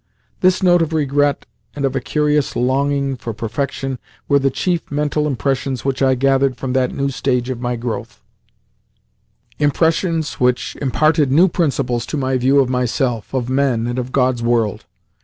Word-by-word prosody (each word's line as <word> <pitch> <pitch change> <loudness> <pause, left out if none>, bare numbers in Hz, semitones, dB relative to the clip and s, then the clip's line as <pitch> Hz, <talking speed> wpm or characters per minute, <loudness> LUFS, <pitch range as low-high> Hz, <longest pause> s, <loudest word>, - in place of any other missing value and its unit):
This 185 +1 +2
note 175 -1 +5
of 165 -1 -1
regret 145 -1 +1 0.3
and 140 -1 -1
of 135 0 -1
a - - +1
curious 150 +2 0
longing 140 +2 0
for 115 -3 -6
perfection 130 +3 -3 0.3
were 140 -1 +4
the 135 0 +2
chief 175 +5 -2
mental 150 +1 0
impressions 135 -2 -2
which 135 -1 -1
I 130 -1 +4
gathered 135 0 +2
from 130 -2 -3
that 130 -1 +1
new 140 0 -2
stage 125 -1 -1
of 125 -2 -5
my 120 0 -1
growth 115 -1 -5 1.4
impressions 160 +2 +1
which 125 0 +1
imparted 150 +1 +2
new 170 +7 +6
principles 140 -9 -1
to 155 - -3
my 130 -1 0
view 135 +3 +3
of 135 - +3
myself, 125 -2 -1
of 130 -3 -2
men, 130 -3 +1
and 120 +1 -2
of 125 0 -5
God's 125 -2 +1
world. 115 -3 0
135 Hz, 165 wpm, -18 LUFS, 125-145 Hz, 1.4 s, new